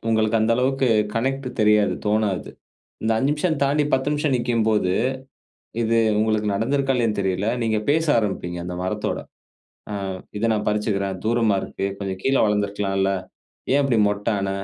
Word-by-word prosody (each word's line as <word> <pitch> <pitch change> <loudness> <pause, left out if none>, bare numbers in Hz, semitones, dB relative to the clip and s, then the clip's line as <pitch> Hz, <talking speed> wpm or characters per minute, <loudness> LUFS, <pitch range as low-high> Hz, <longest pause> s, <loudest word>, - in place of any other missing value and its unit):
உங்களுக்கு 110 0 +2
அந்த 110 +1 +2
அளவுக்கு 135 +1 +1 0.3
கனெக்ட் 135 +3 -1
தெரியாது, 105 -1 +4
தோணாது. 105 -3 0 0.5
இந்த 110 +1 +1
5 135 +5 +1
நிமிஷம் 155 +1 0
தாண்டி, 145 +2 +2
10 130 +2 0
நிமிஷம் 150 -2 0
நிற்கும்போது, 110 -5 +1 0.9
இது 115 0 +2 0.2
உங்களுக்கு 110 -1 +1
நடந்திருக்கா 135 +6 +1
இல்லையான்னு 115 -4 0
தெரியலை. 95 +2 0
நீங்க 110 -1 +1
பேச 160 +2 +2
ஆரம்பிப்பீங்க, 90 -5 -2
அந்த 90 0 -5
மரத்தோட. 105 +3 -2 0.7
ஆ - - -3 0.4
"இத 105 - -4
நான் 105 -1 -2
பறிச்சுக்கிறேன். 100 -2 -1
தூரமா 115 -2 +2
இருக்கு. 100 - -3
கொஞ்சம் 95 -2 -4
கீழ 135 - +2
வளர்ந்திருக்கலாம்ல. 100 -2 0 0.6
ஏன் 140 - +4
இப்பிடி 130 -5 +2
மொட்டு 105 +1 -1
ஆன? 100 0 -2
110 Hz, 150 wpm, -23 LUFS, 100-130 Hz, 0.9 s, தெரியாது